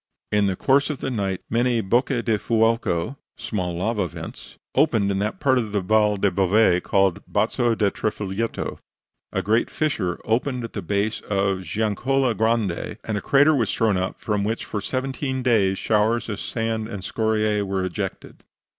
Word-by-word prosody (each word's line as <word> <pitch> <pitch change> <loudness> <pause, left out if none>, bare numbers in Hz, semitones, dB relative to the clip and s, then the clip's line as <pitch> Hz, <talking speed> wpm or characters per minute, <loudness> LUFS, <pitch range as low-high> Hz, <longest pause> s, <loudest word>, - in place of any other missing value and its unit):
In 105 -1 +3
the 95 - 0
course 140 +8 +2
of 150 - -2
the 135 - -3
night 100 -5 -2
many 120 +1 +1
bocche 120 +4 +1
del 110 -3 +1
fuoco 115 -1 +1 0.2
(small 95 -8 -3
lava 100 0 0
vents) - - -10 0.2
opened 110 -10 +3
in 95 - -1
that 105 +2 -2
part 130 -3 +3
of 110 -3 -4
the 100 - +1
Val 105 +2 +3
del 100 0 +2
Bove 95 0 +3
called 95 -3 +2
the - - -14
Bazo 120 -1 +1
di 105 -3 +1
Trifoglietto, 105 +1 -3 0.5
a - - -1
great 110 +4 +2
fissure 105 - -1
opened 125 +2 0
at 115 - -7
the 105 - -3
base 100 +4 -1
of 100 -2 +1
the - - -9
Giannicola 115 +5 0
Grande, 110 -4 0
and 110 - -3
a 100 - -2
crater 145 +6 +4
was 115 -6 +1
thrown 110 -3 +2
up 95 +1 -2
from 105 -2 -1
which 110 +3 -2
for 105 - -4
seventeen 130 +2 -2
days 100 -6 +3
showers 110 +3 +1
of 100 - -4
sand 110 -1 -2
and 100 -5 -6
scoriae 110 +1 0
were 95 -1 -1
ejected. 90 - -5
110 Hz, 180 wpm, -23 LUFS, 100-120 Hz, 0.5 s, crater